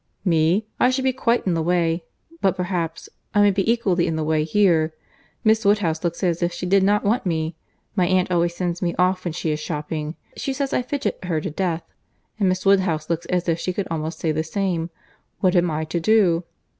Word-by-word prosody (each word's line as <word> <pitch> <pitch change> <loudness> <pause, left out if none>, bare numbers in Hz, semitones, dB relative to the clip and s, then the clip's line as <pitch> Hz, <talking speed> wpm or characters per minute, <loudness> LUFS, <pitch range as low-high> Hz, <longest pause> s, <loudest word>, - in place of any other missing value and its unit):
"Me! 170 +4 +3
I 250 - +5
should 260 +1 0
be 260 0 +2
quite 245 -2 +1
in 185 - +1
the 165 - 0
way. 170 0 +1 0.4
But, 190 - +2
perhaps—I 180 +2 -2
may 205 - +5
be 195 +3 +1
equally 195 -7 +1
in 165 - -1
the 160 - -1
way 155 0 +1
here. 160 -3 +2 0.5
Miss 220 0 +3
Woodhouse 200 -6 +2
looks 170 +2 -2
as 175 -2 +1
if 175 0 +1
she 175 - -5
did 195 +2 +4
not 205 +2 +3
want 220 +5 +1
me. 160 -2 -1 0.4
My 180 -3 +2
aunt 185 0 +2
always 170 -1 +1
sends 175 -1 -2
me 175 -2 -1
off 185 +1 +2
when 175 - -1
she 165 -1 -2
is 150 - -2
shopping. 150 0 -4 0.2
She 270 - -3
says 275 0 -2
I - - +2
fidget 275 -2 -3
her 165 -3 0
to 155 - -4
death; 170 0 -1 0.6
and 195 -3 +3
Miss 185 +1 -1
Woodhouse 180 -5 +2
looks 170 0 -2
as 180 -1 -1
if 165 0 +1
she 185 - -2
could 200 +1 -3
almost 160 0 -3
say 160 - 0
the 155 +1 -1
same. 175 -1 -2 0.5
What 185 -1 +2
am 175 0 +3
I 155 0 -2
to 160 +2 -2
do?" 180 -3 +3
175 Hz, 220 wpm, -22 LUFS, 165-195 Hz, 0.6 s, I